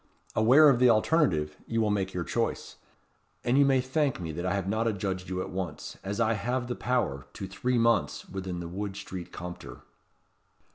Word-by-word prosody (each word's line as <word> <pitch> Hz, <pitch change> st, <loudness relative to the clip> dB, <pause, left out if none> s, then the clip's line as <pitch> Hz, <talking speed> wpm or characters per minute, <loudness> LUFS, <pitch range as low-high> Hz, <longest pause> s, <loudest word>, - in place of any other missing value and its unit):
Aware 130 Hz, +8 st, +7 dB
of 135 Hz, -4 st, +5 dB
the 125 Hz, 0 st, +6 dB
alternative, 110 Hz, -, +2 dB
you 115 Hz, -, -1 dB
will 110 Hz, -2 st, +2 dB
make 95 Hz, -2 st, 0 dB
your 90 Hz, -2 st, -3 dB
choice. 115 Hz, +6 st, -2 dB, 0.7 s
And 120 Hz, +1 st, +2 dB
you 140 Hz, -, +6 dB
may 135 Hz, -2 st, +4 dB
thank 135 Hz, 0 st, 0 dB
me 85 Hz, -3 st, -4 dB
that 85 Hz, +4 st, -3 dB
I 90 Hz, -, +1 dB
have 95 Hz, -2 st, -2 dB
not 110 Hz, +3 st, 0 dB
adjudged 95 Hz, -3 st, -2 dB
you 90 Hz, 0 st, -2 dB
at -, -, -8 dB
once 95 Hz, -1 st, -5 dB
as 100 Hz, +3 st, -3 dB
I 115 Hz, -1 st, +3 dB
have 120 Hz, +4 st, -1 dB
the 125 Hz, 0 st, -3 dB
power 120 Hz, -, -1 dB
to -, -, -6 dB
three 120 Hz, +7 st, -1 dB
months 115 Hz, 0 st, +1 dB
within 95 Hz, -2 st, -5 dB
the 85 Hz, -, -5 dB
Wood 95 Hz, +3 st, -4 dB
Street 95 Hz, -3 st, -7 dB
Compter." 90 Hz, 0 st, -8 dB
105 Hz, 195 wpm, -28 LUFS, 95-120 Hz, 0.7 s, Aware